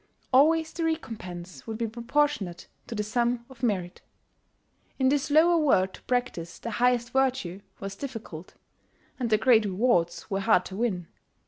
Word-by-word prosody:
Always 315 +4 +4
the 335 - -3
recompense 190 - -5
would 220 -1 -4
be 230 - -1
proportionate 235 -5 -1 0.2
to 230 - -5
the 210 - -1
sum 235 +2 0
of 245 -3 -15
merit. 185 -7 -1 1.0
In 260 -1 +3
this 285 +1 +1
lower 330 +4 +5
world 190 -11 +3
to - - -12
practise 245 -10 -2
the 230 - -6
highest 240 0 +1
virtue 260 -9 0 0.2
was 195 0 -6
difficult; 220 - -8 0.6
and 240 -2 -1
the 215 - +4
great 225 0 +5
rewards 185 -4 +1
were 195 -2 -1
hard 195 -3 +3
to 190 - -7
win. 195 -6 -1
235 Hz, 155 wpm, -27 LUFS, 195-260 Hz, 1.0 s, lower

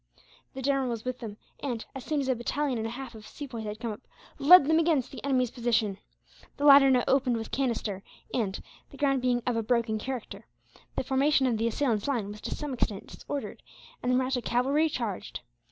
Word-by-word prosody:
The 265 - -5
general 275 -1 +1
was 230 -1 -4
with 255 0 -3
them 215 -3 -7 0.2
and, 245 -5 -3
as 270 - -7
soon 300 -2 -1
as 270 - -3
a 260 - +3
battalion 255 +2 -1
and 220 - -2
a - - -4
half 255 +1 -7
of 215 -1 -11
Sepoys 245 -6 -7
had 210 0 -5
come 230 -1 -3
up, 210 - -8 0.4
led 295 +2 +9
them 320 +2 +4
against 320 -6 +1
the - - -9
enemy's 255 -3 +1
position. 230 -5 0 0.6
The 285 - -1
latter 275 -1 +9
now 250 -2 +4
opened 260 -3 +2
with 225 -1 -6
canister 230 -7 -1 0.3
and, 205 -6 -1 0.3
the 280 - -13
ground 275 -2 +2
being 245 -1 +1
of 245 - 0
a 230 - +1
broken 225 -1 0
character, 255 0 -6 0.5
the - - -1
formation 270 +2 +2
of 235 -4 +1
the 230 - +1
assailants' 230 -2 0
line 230 -8 -1
was 210 - -10
to - - -4
some 295 -2 -4
extent 210 -5 -2
disordered 285 -1 -6 0.4
and 250 - 0
the - - +3
Mahratta 255 0 +1
cavalry 275 +7 +2
charged. 230 -9 -4
250 Hz, 210 wpm, -28 LUFS, 225-275 Hz, 0.6 s, led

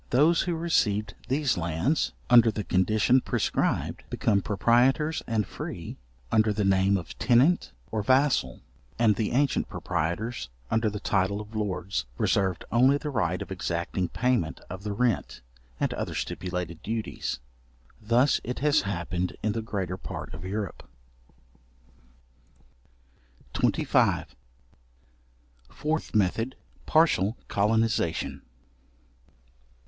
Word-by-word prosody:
Those 155 +7 +4
who 175 -2 -1
received 105 - +1
these 135 -4 +1
lands, 85 - 0 0.2
under 120 -1 +7
the 105 -1 -3
condition 110 +8 +3
prescribed, - - -1
became 100 -3 +1
proprietors 125 - +2
and 110 -3 0
free, - - -7 0.4
under 110 0 +4
the 105 -1 0
name 95 +1 +3
of 90 - -7
tenant, 135 +8 +3 0.2
or 110 - -1
vassal; 130 - +2 0.4
and 110 -3 +4
the 110 0 -1
ancient 140 +2 +1
proprietors, 105 - -3 0.2
under 110 -1 +2
the 105 0 -5
title 100 0 0
of 105 +1 -9
lords, 95 - -2
reserved 95 -3 +1
only 130 +4 +5
the 150 0 -5
right 90 - 0
of - - -14
exacting 90 0 -2
payment 125 -10 0
of 95 0 -6
the 105 +1 -4
rent, 115 - -1 0.4
and - - 0
other - - -4
stipulated 90 -3 -4
duties. 110 0 -3 0.6
Thus 120 +5 +3
it 125 +2 -4
has 150 +1 +3
happened 90 -2 -3
in 110 - +1
the 115 - -2
greater 95 -5 -3
part - - -7
of 80 +2 -8
Europe. 100 -1 -4 2.7
§25. - - +2 1.4
Fourth 155 -4 -3
Method. 110 +5 +1 0.3
Partial 120 - +3
colonization. 110 -5 0
110 Hz, 115 wpm, -27 LUFS, 95-125 Hz, 2.7 s, under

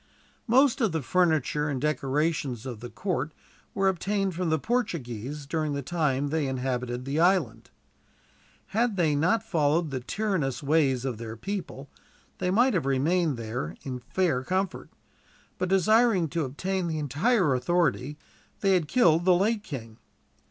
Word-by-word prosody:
Most 260 +3 +4
of 220 -7 +2
the 160 -3 -1
furniture 155 -2 +1
and 135 -3 -2
decorations 145 -3 -1
of 120 -5 -6
the 120 +2 -8
court 160 -5 -3 0.4
were 195 -1 +2
obtained 195 +1 0
from 175 0 -2
the 160 - +2
Portuguese, 150 - -3
during 155 0 -1
the 140 0 -3
time 145 -3 0
that - - -8
they 150 -3 0
inhabited 125 -1 -3
the 140 +3 -1
island. 175 - +2 1.0
Had 225 -1 0
they 160 -4 +2
not 180 +9 +2
followed 155 -1 +1
the 130 - -2
tyrannous 155 - -2
ways 140 -4 +2
of 125 -5 -3
their 115 -1 -7
people, 170 - -5 0.5
they 180 - 0
might 240 +7 +3
have 165 -8 0
remained 150 +2 +1
there 110 -8 -4
in 130 -2 -5
fair 145 0 0
comfort; 185 +4 -2 0.7
but, 185 0 -1
desiring 195 0 +4
to 165 -1 -1
obtain 185 +7 -2
the 160 -1 -2
entire 155 - +2
authority, 150 0 0 0.4
they 195 -1 +3
had 175 -5 +2
killed 170 -6 +4
the 180 0 +5
late 210 +4 +1
king. 115 - -8
155 Hz, 155 wpm, -27 LUFS, 135-185 Hz, 1.0 s, the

